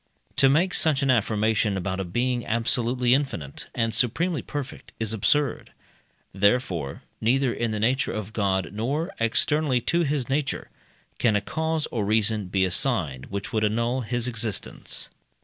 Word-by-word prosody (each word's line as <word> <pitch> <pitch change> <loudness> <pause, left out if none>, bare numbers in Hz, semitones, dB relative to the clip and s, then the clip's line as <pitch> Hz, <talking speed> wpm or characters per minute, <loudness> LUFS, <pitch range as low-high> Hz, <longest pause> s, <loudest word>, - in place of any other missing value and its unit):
To 135 - +6
make 175 +7 +3
such 150 -3 +2
an 135 - +4
affirmation 110 -2 +1
about 95 0 -2
a - - 0
being 120 +7 -1
absolutely 120 +2 +2
infinite 130 - -2
and 115 -2 0
supremely 145 - +2
perfect 145 -3 -7
is 110 -1 0
absurd; 140 +7 +1 0.6
therefore, 95 - 0 0.2
neither 125 +2 +2
in 120 - -1
the 110 -1 -2
nature 130 +5 +1
of 110 0 -5
God, 95 -3 0
nor 140 - -2
externally 130 +4 +2
to 170 +7 +1
his 145 -5 0
nature, 135 0 -2 0.5
can 115 -3 +3
a - - +4
cause 160 +8 -2
or 115 -4 -1
reason 105 -1 +1
be 95 +1 +2
assigned 90 - 0
which 100 +2 -5
would 110 -1 +1
annul 115 +4 +1
his 120 +1 -1
existence. 115 -3 -3
115 Hz, 150 wpm, -25 LUFS, 105-135 Hz, 0.6 s, To